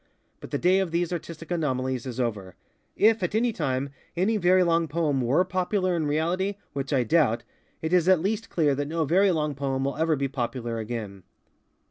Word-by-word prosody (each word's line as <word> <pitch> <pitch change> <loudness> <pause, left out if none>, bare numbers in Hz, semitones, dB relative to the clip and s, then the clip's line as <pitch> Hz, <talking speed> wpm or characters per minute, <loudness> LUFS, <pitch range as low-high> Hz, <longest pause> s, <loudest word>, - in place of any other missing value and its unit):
But - - -10
the - - -1
day 185 +2 +3
of 190 -2 0
these 170 +1 -1
artistic 165 0 -7
anomalies 130 -6 -1
is 125 0 -5
over. 105 -7 -3 0.4
If, 220 0 +4
at 180 +3 -1
any 235 +1 +2
time, 140 -5 -2 0.3
any 200 +6 +2
very 185 -1 +4
long 165 -1 +2
poem 150 -3 0
_were 140 +10 +2
_popular 185 0 0
in 160 -3 -1
reality, 175 +7 0 0.2
which 135 -1 -4
I 130 -4 +3
doubt, 130 -3 +2 0.4
it 160 +2 -1
is 180 0 +4
at 185 -3 +6
least 210 +5 -2
clear 150 -4 +2
that 140 +1 -2
no 160 +1 -1
very 190 +6 +4
long 150 -4 0
poem 135 -1 -2
will 140 +1 -2
ever 160 0 +2
be 140 -1 -1
popular 120 -3 -3
again. 110 -3 -5
160 Hz, 195 wpm, -26 LUFS, 130-180 Hz, 0.4 s, at